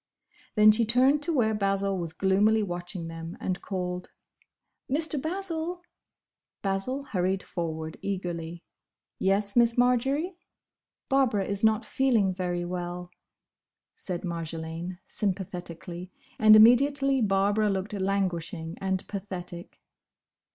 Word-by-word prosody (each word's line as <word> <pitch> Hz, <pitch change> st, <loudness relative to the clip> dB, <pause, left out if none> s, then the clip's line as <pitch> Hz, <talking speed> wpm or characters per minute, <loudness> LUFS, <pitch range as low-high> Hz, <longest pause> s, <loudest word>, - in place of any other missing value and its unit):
Then 215 Hz, 0 st, +8 dB
she 225 Hz, +2 st, +1 dB
turned 255 Hz, +6 st, +4 dB
to 335 Hz, -, -1 dB
where 235 Hz, -8 st, +2 dB
Basil 195 Hz, -1 st, 0 dB
was 170 Hz, -3 st, -3 dB
gloomily 200 Hz, +5 st, +3 dB
watching 175 Hz, -2 st, -5 dB
them, 165 Hz, +1 st, -7 dB
and 185 Hz, -1 st, -3 dB
called, 180 Hz, -2 st, -4 dB, 0.8 s
"Mr. 300 Hz, 0 st, 0 dB
Basil!" 350 Hz, 0 st, -3 dB, 0.8 s
Basil 200 Hz, +8 st, -1 dB
hurried 190 Hz, -5 st, -1 dB
forward 160 Hz, -2 st, -4 dB
eagerly, 175 Hz, -3 st, -4 dB, 0.6 s
"Yes, 200 Hz, +1 st, +1 dB
Miss 235 Hz, -1 st, +5 dB
Marjory?" 270 Hz, +8 st, +2 dB, 0.7 s
"Barbara 250 Hz, -8 st, +2 dB
is 200 Hz, +1 st, -2 dB
not 220 Hz, +1 st, +3 dB
feeling 230 Hz, -8 st, +2 dB
very 175 Hz, -1 st, -2 dB
well," 175 Hz, 0 st, -5 dB, 0.8 s
said 180 Hz, -1 st, -5 dB
Marjolaine, 165 Hz, +1 st, -5 dB
sympathetically; 180 Hz, -2 st, -4 dB, 0.3 s
and 215 Hz, 0 st, +8 dB
immediately 270 Hz, +4 st, +5 dB
Barbara 205 Hz, +1 st, +2 dB
looked 195 Hz, +1 st, -2 dB
languishing 185 Hz, -4 st, -2 dB
and 190 Hz, -1 st, -1 dB
pathetic. 180 Hz, -3 st, -5 dB
195 Hz, 110 wpm, -27 LUFS, 180-230 Hz, 0.8 s, Then